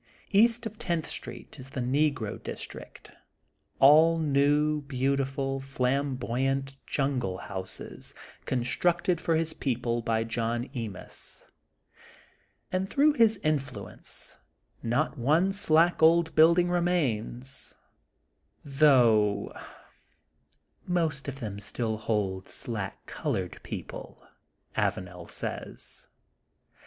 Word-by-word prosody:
East 230 +3 +4
of 220 0 -6
Tenth 170 -7 -1
Street - - -8
is 130 +1 -8
the 135 - -5
Negro 130 -3 0
district, - - -8 0.7
all 155 +4 +7
new, 150 0 +2
beautiful, 135 0 -1
flamboyant 135 0 -1
jungle 130 -10 -1
houses, 95 -1 -7 0.3
constructed 170 +7 +1
for 165 - +1
his 160 0 0
people 120 -3 -1
by 115 -1 0
John 115 +2 -2
Emis, 115 -8 -6 1.3
and 185 +1 -1
through 295 +5 +4
his 225 -6 +4
influence 150 -3 -3 0.4
not 120 +2 0
one 155 +10 +3
slack 170 -3 +3
old 165 +1 +5
build 160 +2 +7
ing 175 0 +3
remains, 135 -8 -1 0.9
though, 120 -8 +4 1.4
''most 160 -6 0
of 135 -1 -5
them 100 -3 -5
still 110 +1 -2
hold 100 -4 -1
slack 105 -5 -5
colored - - -3
people, - - -8 0.2
'* - - -38
Avanel 90 -2 -2
says. - - -5
135 Hz, 100 wpm, -28 LUFS, 120-160 Hz, 1.4 s, all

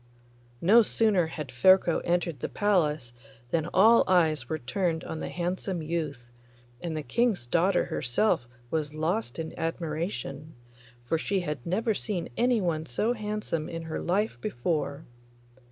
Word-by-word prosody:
No 215 +7 +7
sooner 210 -6 +2
had 155 -4 -6
Ferko 175 +6 +5
entered 170 -4 0
the - - -3
palace 155 - +1 0.4
than 165 0 0
all 225 +5 +6
eyes 160 -8 +2
were 160 - -1
turned 160 +5 -1
on 160 - -5
the - - -4
handsome 180 0 -3
youth, 150 -7 -4 0.5
and 165 -2 -3
the 155 - -3
King's 230 - +1
daughter 175 +9 +2
herself 120 - 0 0.2
was 155 -1 -2
lost 175 +8 -1
in 160 -1 -4
admiration, 155 -3 -4 0.5
for 160 +7 0
she 195 +3 0
had 150 -7 -4
never 220 +6 +1
seen 195 -4 -3
anyone 185 -10 +1
so 215 - 0
handsome 210 -8 -3
in 165 -1 -5
her 160 -1 -4
life 185 - 0
before. 145 +3 -2
165 Hz, 140 wpm, -28 LUFS, 155-195 Hz, 0.5 s, No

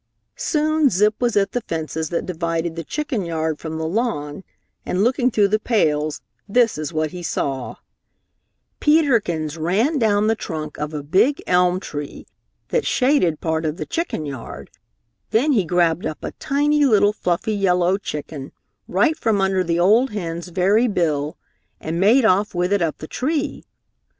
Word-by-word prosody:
Soon 310 -1 +1
Zip 210 +1 +3
was 240 -3 +1
at 195 -1 +2
the 245 - -2
fence 160 -6 -4
that 160 +1 -2
divided 165 -1 -2
the 165 - -4
chicken 285 - -3
yard 160 -2 -2
from 160 -1 -5
the 160 0 -2
lawn, 185 -6 -2 0.4
and 185 +2 0
looking 250 +1 +2
through 210 -4 +2
the 215 +2 +2
pales, 155 -10 0 0.3
this 230 -5 +2
is 155 +1 -4
what 155 -1 -1
he 180 - -7
saw: 135 -6 -3 1.0
Peter 295 -5 +4
Kins 160 -5 -4
ran 215 - +1
down 210 -2 +2
the 220 - +3
trunk 155 -9 -6
of 150 0 -3
a 145 - -4
big 195 - +2
elm 180 0 +3
tree 145 -5 -7 0.4
that - - +1
shaded 250 - +2
part 160 -1 -1
of 155 0 -2
the - - -4
chicken 330 - -3
yard, 135 -5 -8 0.6
then 265 +7 +2
he 220 -8 +3
grabbed 175 0 +1
up 155 - -7
a - - -4
tiny 295 +1 +2
little 210 -5 +4
fluffy 185 +2 -1
yellow 180 -2 +2
chicken 145 -5 -6 0.3
right 320 -1 +2
from 225 -9 0
under 190 -1 +1
the 170 -1 0
old 220 +9 +4
hen's 175 -5 -5
very 195 +7 +2
bill, 155 -7 -1 0.4
and 165 +2 -3
made 225 +6 +5
off 200 -1 +2
with 180 +2 +1
it 200 - +2
up 165 -3 -1
the - - -8
tree. 290 - -2
185 Hz, 170 wpm, -21 LUFS, 160-230 Hz, 1.0 s, made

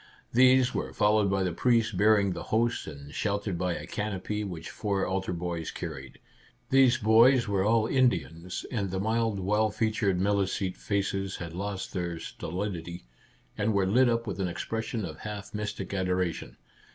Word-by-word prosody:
These 130 +1 +5
were - - -3
followed 105 -1 +3
by 95 0 +1
the 90 -2 -1
priest 115 +1 +2
bearing 105 0 +4
the - - -6
host 115 +2 +1
and 70 -1 -9
sheltered 100 -2 -1
by 90 -1 0
a - - -6
canopy 105 0 -3
which 85 -5 -6
four 100 -3 -1
altar 95 0 -2
boys 85 -2 -3
carried. 65 -1 -7 0.5
These 130 -2 +5
boys 115 +3 +5
were 100 -2 +1
all 110 +1 +3
Indians, 90 - 0
and 100 -6 -1
the 95 +1 -2
mild 110 0 0
well 105 +3 +2
featured 105 -4 0
Milicete 95 -1 0
faces 95 -1 -2
had 85 -2 -7
lost 100 +1 -4
their 85 -2 -2
stolidity, 85 0 -5 0.5
and 105 +1 0
were 100 -1 +3
lit 120 +6 +4
up 115 0 0
with 100 -4 -4
an 95 - 0
expression 110 +4 -3
of 80 -2 -8
half 105 -2 -7
mystic 105 0 -4
adora 90 -2 0
tion. - - -10
100 Hz, 165 wpm, -28 LUFS, 90-110 Hz, 0.5 s, These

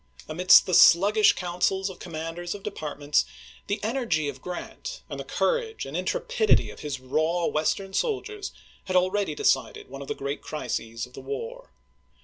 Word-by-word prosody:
Amidst 180 +4 +6
the 185 - -3
sluggish 200 +5 +7
counsels 180 +2 0
of 190 -2 -8
commanders 165 +2 -5
of 200 - -10
departments, 150 -7 -1 0.4
the 205 - -1
energy 220 - 0
of 135 -2 -6
Grant 180 - -7
and - - -5
the - - -4
courage 470 -2 -1
and - - -7
intrepidity 480 -3 +1
of - - -13
his 145 -3 -4
raw 155 +7 0
Western 190 +6 -1
soldiers 420 - -2 0.3
had 185 - -3
al 185 +1 +4
ready 200 -7 -1
decided - - 0
one 135 +1 -8
of 140 - -8
the - - -3
great 140 +1 -4
crises 115 -5 -4
of 125 - -19
the - - -9
war. 465 +3 -6
180 Hz, 165 wpm, -26 LUFS, 155-225 Hz, 0.4 s, sluggish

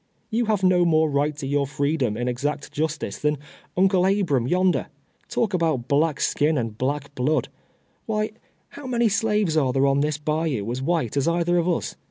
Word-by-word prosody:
You 235 +2 +1
have 210 -3 0
no 180 -1 +4
more 160 -2 +3
right 145 +1 0
to 140 - -5
your 140 0 0
freedom, 140 -5 -1
in 120 +1 -2
exact 140 +4 -2
justice, 155 0 -3
than 150 0 +1 0.4
Uncle 185 0 +4
Abram 175 - +1
yonder. 180 +3 +2 0.4
Talk 215 -4 0
about 160 -8 0
black 150 +2 +2
skin, 150 +1 +1
and 115 -4 -2
black 140 +4 -2
blood; 145 +4 0 0.6
why, 215 -1 -1 0.4
how 285 -2 -9
many 235 -2 +2
slaves 210 -4 +1
are 135 -5 +2
there 135 +2 +2
on 140 0 +3
this 150 +1 0
bayou 150 -7 -1
as 125 +2 -3
white 145 -5 -1
as 140 - +1
either 175 +1 +2
of 170 +1 0
us? 175 - -1
155 Hz, 185 wpm, -24 LUFS, 140-180 Hz, 0.6 s, no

